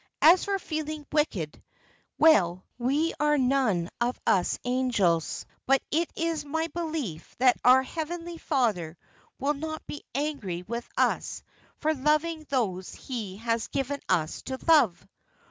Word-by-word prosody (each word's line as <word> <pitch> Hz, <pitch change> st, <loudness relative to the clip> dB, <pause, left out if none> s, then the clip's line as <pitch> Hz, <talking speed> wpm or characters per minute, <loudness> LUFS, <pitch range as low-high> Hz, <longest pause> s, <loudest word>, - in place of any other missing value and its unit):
As 340 Hz, +4 st, +7 dB
for 400 Hz, -1 st, 0 dB
feeling 310 Hz, -4 st, -4 dB
wicked 205 Hz, -, -1 dB, 0.6 s
well, 185 Hz, -, +4 dB
we 285 Hz, +7 st, +1 dB
are 295 Hz, 0 st, +3 dB
none 250 Hz, -10 st, +2 dB
of 245 Hz, +1 st, 0 dB
us 185 Hz, -2 st, +2 dB
angels, 240 Hz, -10 st, +1 dB, 0.2 s
but 270 Hz, +1 st, +5 dB
it 330 Hz, +3 st, +1 dB
is 330 Hz, -2 st, -1 dB
my 320 Hz, +3 st, -1 dB
belief 310 Hz, -, -4 dB
that 250 Hz, 0 st, +4 dB
our 255 Hz, +1 st, +7 dB
Heavenly 335 Hz, +3 st, -5 dB
Father 205 Hz, -, 0 dB, 0.4 s
will 280 Hz, +2 st, +1 dB
not 315 Hz, +2 st, -5 dB
be 295 Hz, -, -7 dB
angry 270 Hz, -, -2 dB
with 235 Hz, +5 st, -5 dB
us -, -, 0 dB, 0.3 s
for 310 Hz, +1 st, +1 dB
loving 305 Hz, +3 st, +1 dB
those 195 Hz, -9 st, -1 dB
He 215 Hz, -7 st, -6 dB
has 230 Hz, +1 st, -1 dB
given 280 Hz, +1 st, -2 dB
us 165 Hz, -4 st, +1 dB
to 260 Hz, -, -3 dB
love.' 250 Hz, -, +4 dB
270 Hz, 135 wpm, -27 LUFS, 210-310 Hz, 0.6 s, As